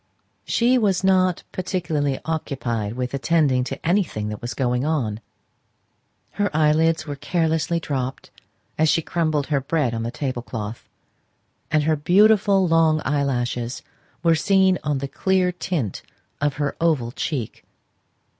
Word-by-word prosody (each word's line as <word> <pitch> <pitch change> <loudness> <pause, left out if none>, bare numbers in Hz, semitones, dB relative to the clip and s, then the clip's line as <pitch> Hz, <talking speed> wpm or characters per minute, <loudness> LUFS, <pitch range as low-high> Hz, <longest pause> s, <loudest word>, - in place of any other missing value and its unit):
She 245 +2 +3
was 195 -4 +1
not 185 -2 +3
particularly 160 -7 -1
occupied 120 -9 -2
with 125 +1 -4
attending 140 -2 +2
to 135 +4 -6
anything 170 - 0
that 105 - -6
was 120 -1 -5
going 125 -1 0
on; 130 -9 -1 1.1
her 205 0 0
eyelids 160 +1 +3
were 145 -3 -5
carelessly 160 +2 0
dropped, 135 -5 -4 0.5
as 160 0 +4
she 165 - +2
crumbled 155 -4 0
her 140 - +2
bread 140 -3 0
on 115 - -2
the 115 - -2
tablecloth, 120 -4 -5 0.8
and 155 -1 +2
her 155 +1 +2
beautiful 195 +4 +4
long 165 -1 +3
eyelashes 125 -4 -1 0.4
were 165 -1 +5
seen 190 +3 +3
on 150 -2 0
the 140 +1 -3
clear 185 +5 +1
tint 170 - -3 0.4
of 145 -1 +1
her 145 -1 -2
oval 150 -8 +1
cheek. 130 -3 -4
150 Hz, 135 wpm, -22 LUFS, 130-170 Hz, 1.1 s, were